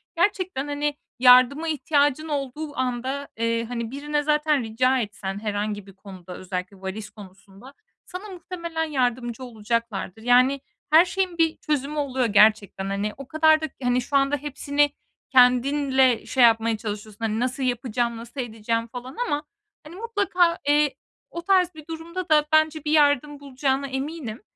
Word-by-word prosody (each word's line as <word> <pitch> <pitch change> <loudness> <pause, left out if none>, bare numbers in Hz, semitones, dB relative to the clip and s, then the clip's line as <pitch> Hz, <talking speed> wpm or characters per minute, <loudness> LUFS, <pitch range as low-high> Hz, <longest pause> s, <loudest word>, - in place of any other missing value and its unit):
gerçekten, 355 -5 0
hani, 290 0 -2 0.2
yardıma 255 +5 +6
ihtiyacın 295 -1 +1
olduğu 290 +1 -4
anda, 260 +2 -2
eee, 230 0 0
hani, 235 -1 -5
birine 295 +2 -2
zaten 300 -2 +1
rica 255 +4 +1
etsen 200 -3 -4
herhangi 205 -1 -3
bir 195 - -13
konuda, 185 -2 -11
özellikle 185 +1 -6
valiz 195 +2 -6
konusunda 200 +4 -15 0.3
sana 380 +3 -8
muhtemelen 340 -3 -5
yardımcı 250 -4 -2
olacaklardır. 225 -3 -3
Yani 250 +3 +4 0.3
her 320 +3 +7
şeyin 370 -1 -2
bir 325 -1 +2
çözümü 295 -1 -2
oluyor 265 -3 0
gerçekten. 210 -2 +3
Hani, 200 +2 -2
o 275 -1 -9
kadar 315 +1 +4
da - - -1 0.2
hani 245 0 +2
şu 280 - -5
anda 275 +1 +2
hepsini 290 +1 0 0.4
kendinle 260 0 +4
şey 255 - +2
yapmaya 225 -1 +4
çalışıyorsun. 210 0 -7
"Hani 220 0 -1
nasıl 255 +2 -2
yapacağım, 240 -1 -1
nasıl 235 +4 -6
edeceğim?" 230 0 -3
falan 250 +3 -9
ama 295 -5 -1 0.4
hani 310 +3 -12
mutlaka, 390 -5 +1
eee, 295 -1 +3 0.3
o 340 - -6
tarz 360 -1 +2
bir 310 -1 -12
durumda 335 +3 -6
da 300 -1 +4
bence 310 -1 +3
bir 300 - 0
yardım 290 -1 +3
bulacağına 275 0 -1
eminim. 265 -3 -5
265 Hz, 150 wpm, -24 LUFS, 230-300 Hz, 0.4 s, her